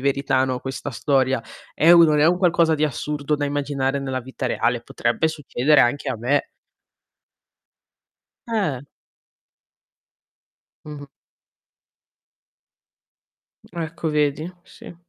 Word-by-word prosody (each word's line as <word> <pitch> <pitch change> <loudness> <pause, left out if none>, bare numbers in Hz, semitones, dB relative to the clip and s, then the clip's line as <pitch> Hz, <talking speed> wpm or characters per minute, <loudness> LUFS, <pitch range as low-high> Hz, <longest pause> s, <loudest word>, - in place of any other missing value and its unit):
verità, 140 -1 +1
no, 130 -1 -2
questa 135 +3 -6
storia. 135 0 +1 0.3
È 160 - +2
un 170 -1 +8
non 150 - +2
è 150 - +4
un 175 +2 +3
qualcosa 170 -3 +3
di 150 - -3
assurdo 150 +1 -2
da 145 - -2
immaginare 140 -1 -2
nella 135 -1 -3
vita 130 +1 -6
reale, 120 0 0
potrebbe 120 +6 -1
succedere 150 -1 +1
anche 140 +4 +1
a 130 - -2
me." 125 - 0 2.0
Eh. 195 - -1 2.1
Mh-mh. 150 -1 -9 2.7
Ecco, 165 -1 -4
vedi? 150 +2 0
Sì. 175 - -13
145 Hz, 105 wpm, -22 LUFS, 130-155 Hz, 2.7 s, un